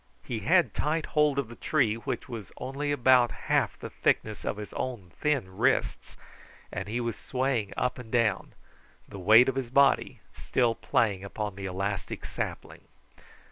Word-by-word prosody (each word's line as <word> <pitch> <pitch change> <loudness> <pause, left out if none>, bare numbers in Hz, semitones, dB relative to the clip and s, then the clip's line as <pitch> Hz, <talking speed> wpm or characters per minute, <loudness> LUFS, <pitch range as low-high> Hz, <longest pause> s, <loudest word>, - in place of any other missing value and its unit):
He 115 - -4
had 175 - +3
tight 155 +1 0
hold 150 -2 +2
of 140 -4 0
the 120 - -11
tree, 130 -7 +1
which 115 - -4
was 115 -5 -7
only 140 +3 -3
about 130 -3 +5 0.2
half - - +2
the - - -8
thickness 110 -1 0
of - - -2
his 105 -1 -8
own 110 -9 -5
thin 130 -11 0
wrists, - - 0 0.6
and 95 - -4
he 115 +3 -2
was 115 -2 -2
swaying 125 -6 -1
up 125 0 -1
and 115 -3 -10
down, 115 -5 +1 0.5
the 100 - -9
weight 110 +7 +7
of 135 - +1
his 130 -2 -3
body 140 +2 +3
still 120 -3 +1
playing 100 -4 0
upon 105 +1 -4
the 95 0 -6
elastic 100 +1 -3
sapling. - - -6
120 Hz, 165 wpm, -28 LUFS, 105-135 Hz, 0.6 s, weight